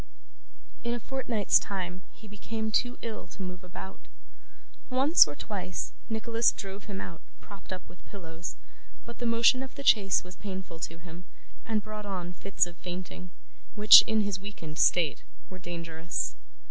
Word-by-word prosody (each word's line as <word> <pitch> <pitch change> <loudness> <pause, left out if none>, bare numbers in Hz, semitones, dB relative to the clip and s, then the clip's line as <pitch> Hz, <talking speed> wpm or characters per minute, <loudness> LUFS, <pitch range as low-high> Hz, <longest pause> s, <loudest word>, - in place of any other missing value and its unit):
In 235 0 -1
a - - -4
fortnight's 235 -4 +2
time, 185 -2 -5
he 220 - -15
became 220 +2 -4
too 245 +3 +1
ill 230 -2 -5
to 195 - -8
move 180 0 -7
about. 185 +1 -10 0.8
Once 270 - +6
or 145 - -6
twice, 185 -1 -4 0.2
Nicholas 225 +1 +2
drove 195 +1 -7
him 200 -3 -5
out, 165 -2 -8 0.2
propped 200 -2 -12
up 185 - -6
with 175 - -16
pillows; 170 -3 -8 0.5
but 235 - -10
the 240 - -1
motion 230 +2 +5
of 265 -1 -8
the 280 - -7
chaise 200 -7 +4
was 180 0 -11
painful 190 -4 -7
to 165 0 -5
him, 170 +1 -11 0.4
and 215 -2 0
brought 215 -1 -7
on 180 -3 -4
fits 195 +1 0
of 175 -1 -12
fainting, 180 0 -7 0.5
which, 210 0 +11
in 220 -1 +2
his 200 -2 -1
weakened 170 -6 -7
state, 165 -5 +3 0.3
were 185 - -9
dangerous. 170 -1 -4
195 Hz, 160 wpm, -29 LUFS, 180-220 Hz, 0.8 s, which